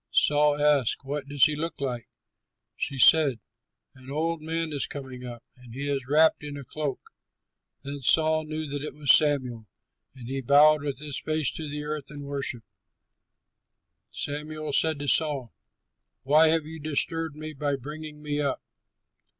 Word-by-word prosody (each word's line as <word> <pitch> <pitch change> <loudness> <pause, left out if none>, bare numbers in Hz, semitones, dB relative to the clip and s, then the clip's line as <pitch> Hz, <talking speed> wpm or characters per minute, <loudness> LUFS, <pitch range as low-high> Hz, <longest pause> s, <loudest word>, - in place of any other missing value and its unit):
Saul 150 0 +3
asked, 145 -5 +2
"What 140 0 -4
does 145 -1 +1
he 155 - +5
look 165 +3 -4
like?" 125 -4 -4 0.7
She 140 - -3
said, 140 -3 +6 0.5
"An 130 -1 -15
old 160 +3 -2
man 160 0 -3
is 140 - -1
coming 130 -3 -8
up, 120 -2 -8
and 125 -2 -14
he 140 +2 -4
is 135 -3 -2
wrapped 155 +2 +4
in 145 -1 -6
a 140 - -7
cloak." 145 +1 -4 0.8
Then 140 +1 -6
Saul 155 +4 +3
knew 155 0 -4
that 145 -1 -5
it 150 - -6
was 145 -3 +5
Samuel; 130 -7 +2 0.5
and 125 -3 -10
he 135 +1 -3
bowed 145 +3 +5
with 140 -2 -3
his 145 -1 -4
face 155 -3 -1
to 155 -2 -6
the 150 +1 -5
earth 150 -1 -5
and 145 -1 -9
worshipped. 140 -5 -3 1.4
Samuel 150 +1 -4
said 160 +1 +2
to 145 0 -5
Saul, 140 -6 +1 0.7
"Why 155 +4 +5
have 160 -1 +2
you 160 +1 -9
disturbed 155 +1 -1
me 155 0 -7
by 145 0 -1
bringing 150 +2 -9
me 150 0 -2
up?" 140 -2 -1
145 Hz, 165 wpm, -26 LUFS, 135-155 Hz, 1.4 s, said